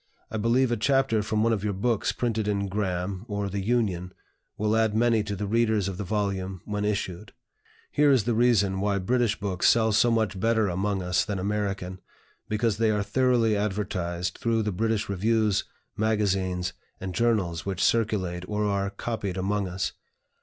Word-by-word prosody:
I -, -, -2 dB
believe 120 Hz, +4 st, +2 dB
a 120 Hz, -, +1 dB
chapter 135 Hz, -1 st, +2 dB
from 105 Hz, +1 st, 0 dB
one 115 Hz, 0 st, +3 dB
of 105 Hz, -3 st, -2 dB
your 105 Hz, -1 st, 0 dB
books 110 Hz, +3 st, 0 dB
printed 115 Hz, -3 st, -1 dB
in 100 Hz, -1 st, 0 dB
'Graham,' 95 Hz, -1 st, -2 dB
or 100 Hz, -2 st, -2 dB
'The 100 Hz, +1 st, -3 dB
Union,' 95 Hz, -6 st, 0 dB, 0.4 s
will 105 Hz, +1 st, +1 dB
add 110 Hz, -1 st, +2 dB
many 115 Hz, -1 st, +3 dB
to 105 Hz, -1 st, -4 dB
the 105 Hz, +2 st, -3 dB
readers 110 Hz, -2 st, +1 dB
of 95 Hz, -2 st, -4 dB
the 100 Hz, -, -3 dB
volume 95 Hz, -2 st, -2 dB
when 105 Hz, -1 st, -2 dB
issued. 100 Hz, -1 st, -3 dB, 0.6 s
Here 145 Hz, 0 st, +4 dB
is 130 Hz, -6 st, +4 dB
the 120 Hz, +2 st, 0 dB
reason 105 Hz, -5 st, +3 dB
why 100 Hz, 0 st, +1 dB
British 115 Hz, +3 st, +1 dB
books 95 Hz, -3 st, +1 dB
sell 110 Hz, -1 st, +3 dB
so 115 Hz, +3 st, +4 dB
much 110 Hz, -4 st, 0 dB
better 110 Hz, -1 st, +2 dB
among 95 Hz, +2 st, -1 dB
us 90 Hz, 0 st, +1 dB
than 105 Hz, -2 st, -3 dB
American, 95 Hz, -2 st, -2 dB, 0.5 s
because 110 Hz, 0 st, +1 dB
they 115 Hz, 0 st, +2 dB
are 105 Hz, -1 st, +1 dB
thoroughly 115 Hz, 0 st, +2 dB
advertised 95 Hz, -4 st, -2 dB
through 115 Hz, -1 st, +1 dB
the 105 Hz, -, -1 dB
British 110 Hz, +2 st, 0 dB
reviews, 105 Hz, +1 st, +1 dB, 0.3 s
magazines, 95 Hz, -4 st, 0 dB, 0.3 s
and 95 Hz, -1 st, -5 dB
journals 95 Hz, -8 st, +1 dB
which 95 Hz, -2 st, -1 dB
circulate 100 Hz, -6 st, +1 dB
or 105 Hz, 0 st, -1 dB
are 100 Hz, -1 st, 0 dB
copied 100 Hz, -2 st, -4 dB
among 100 Hz, +1 st, 0 dB
us. 90 Hz, +1 st, -2 dB
105 Hz, 175 wpm, -26 LUFS, 95-110 Hz, 0.6 s, Here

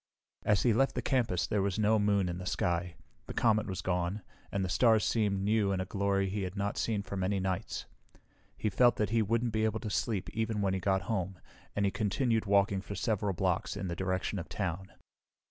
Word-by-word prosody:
As 105 Hz, -2 st, +2 dB
he 120 Hz, -, +4 dB
left 135 Hz, +5 st, +2 dB
the -, -, -2 dB
campus 120 Hz, -10 st, +1 dB
there 105 Hz, -, 0 dB
was 100 Hz, 0 st, 0 dB
no 110 Hz, 0 st, +3 dB
moon 100 Hz, -2 st, +2 dB
in 90 Hz, 0 st, -3 dB
the 90 Hz, -, -6 dB
sky. 85 Hz, 0 st, -1 dB, 0.3 s
The -, -, -7 dB
comet 110 Hz, -3 st, +3 dB
was 95 Hz, -2 st, -4 dB
gone, 90 Hz, +2 st, -1 dB, 0.3 s
and 95 Hz, -1 st, 0 dB
the -, -, -2 dB
stars 110 Hz, +3 st, +4 dB
seemed 100 Hz, -4 st, +1 dB
new 105 Hz, -1 st, +2 dB
in 95 Hz, -, 0 dB
a 95 Hz, -, -1 dB
glory 100 Hz, 0 st, 0 dB
he 100 Hz, +2 st, -2 dB
had 95 Hz, 0 st, -4 dB
not 100 Hz, +1 st, -1 dB
seen 105 Hz, -3 st, 0 dB
for 100 Hz, +1 st, -6 dB
many 95 Hz, +1 st, 0 dB
nights. 95 Hz, +2 st, -3 dB, 0.7 s
He 105 Hz, -, -1 dB
felt 120 Hz, +3 st, +5 dB
that 105 Hz, 0 st, -1 dB
he 115 Hz, 0 st, +3 dB
wouldn't 115 Hz, +2 st, 0 dB
be 110 Hz, 0 st, +1 dB
able 110 Hz, 0 st, +1 dB
to 105 Hz, -, -4 dB
sleep 105 Hz, -2 st, -1 dB
even 110 Hz, -1 st, -1 dB
when 100 Hz, -2 st, +1 dB
he 95 Hz, -, 0 dB
got 95 Hz, +1 st, +1 dB
home, 95 Hz, -4 st, -2 dB, 0.4 s
and 100 Hz, -, +1 dB
he 100 Hz, -, +2 dB
continued 110 Hz, +2 st, 0 dB
walking 100 Hz, -1 st, +3 dB
for 100 Hz, -, -7 dB
several 105 Hz, -1 st, 0 dB
blocks, 85 Hz, -, -1 dB
in 95 Hz, -, -3 dB
the 85 Hz, -, -2 dB
direction 95 Hz, +2 st, -1 dB
of 85 Hz, -, -7 dB
town. 95 Hz, -1 st, -3 dB
100 Hz, 220 wpm, -31 LUFS, 95-110 Hz, 0.7 s, felt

